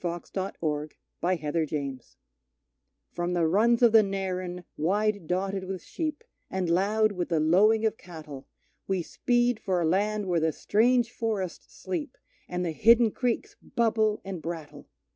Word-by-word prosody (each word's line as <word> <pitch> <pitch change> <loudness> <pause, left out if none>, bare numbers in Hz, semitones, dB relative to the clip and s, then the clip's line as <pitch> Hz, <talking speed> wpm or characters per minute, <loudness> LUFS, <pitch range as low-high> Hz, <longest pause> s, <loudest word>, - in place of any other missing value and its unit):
The 180 - -1
Barcoo 170 0 -5
(The 155 -6 -2 0.3
Squatters' 165 -3 0
Song) 140 -3 -3 1.1
From 175 +1 -2
the 175 -2 +2
runs 230 +8 +3
of 235 - +7
the 220 0 +8
Narran, 185 -3 -3
wide 205 +2 0
dotted 190 +2 -1
with 185 -1 -5
sheep, 310 +2 -4 0.3
And 190 -2 -2
loud 210 +5 +3
with 180 -3 -3
the 165 -3 +2
lowing 210 +8 +4
of 220 0 0
cattle, 155 -6 -10 0.4
We 190 -3 0
speed 240 +4 +1
for 190 -5 0
a 170 - +1
land 205 +5 +1
where 175 -3 +1
the 160 0 +1
strange 235 +2 +2
forests 215 -7 -3
sleep 300 -7 -4 0.3
And 180 0 -2
the 165 - -1
hidden 230 +6 +5
creeks 260 - -2
bubble 220 -3 +1
and 190 -4 -5
brattle! 165 -3 -7
190 Hz, 155 wpm, -27 LUFS, 170-220 Hz, 1.1 s, the